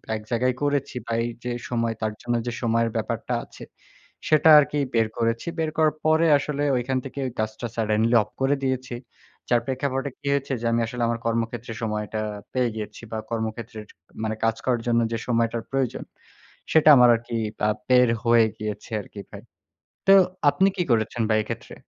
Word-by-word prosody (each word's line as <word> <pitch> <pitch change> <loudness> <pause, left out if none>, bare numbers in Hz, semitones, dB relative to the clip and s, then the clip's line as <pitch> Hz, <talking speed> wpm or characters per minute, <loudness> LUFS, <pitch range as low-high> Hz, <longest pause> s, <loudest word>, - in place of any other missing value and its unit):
এক 110 - -5
জায়গায় 125 +1 +1
করেছি, 145 -2 -1
বা 115 - -6
এই - - -1 0.2
যে 125 - -3 0.2
সময় 115 -2 0
তার 110 -1 0
জন্য 120 -1 -1
যে - - -1
সময়ের 115 0 +1
ব্যাপারটা - - -2
আছে, - - -13 0.6
সেটা 155 +1 +5
আরকি 150 0 0 0.2
বের 115 -1 +3
করেছি। 115 +4 -1
বের 160 -1 0
করার 155 -1 +3
পরে 160 +1 +4
আসলে 145 0 -3
ঐখান 130 +2 -1
থেকে 135 +1 -7 0.2
কাজটা 110 +2 -3
সাডেনলি 110 +1 +1
অফ 105 - -18
করে 135 +2 +3
দিয়েছি। 130 -2 -2 0.5
যার 120 -1 +3
প্রেক্ষাপটে 135 +1 -2
কি 145 - -8
হয়েছে, 140 -1 -1
যে - - -4
আমি 115 - +2
আসলে 125 0 -3
আমার 115 0 -1
কর্মক্ষেত্রে 115 0 -2
সময়টা 105 0 -2 0.3
পেয়ে 125 -2 +1
গিয়েছি 105 -1 -7
বা 110 - -3
কর্মক্ষেত্রের, 110 -1 -4 0.4
মানে 110 0 -1
কাজ 115 0 +2
করার 125 -3 +1
জন্য 120 0 +3
যে 115 - -1
সময়টার 115 -1 0
প্রয়োজন, 135 -3 -1 0.7
সেটা 155 -1 +6
আমার 125 -1 +7
আরকি 115 0 -4 0.3
আ - - +3 0.2
বের 125 -1 +5 0.2
হয়ে 115 -1 +5
গিয়েছে 105 +2 -6
আরকি 100 - -12
ভাই। - - -9 0.7
তো 195 - +7 0.4
আপনি 190 +7 +3
কি 180 - +1
করেছেন 115 0 +1
ভাই 110 - +4
এক্ষেত্রে? - - -7
120 Hz, 175 wpm, -24 LUFS, 115-135 Hz, 0.7 s, আমার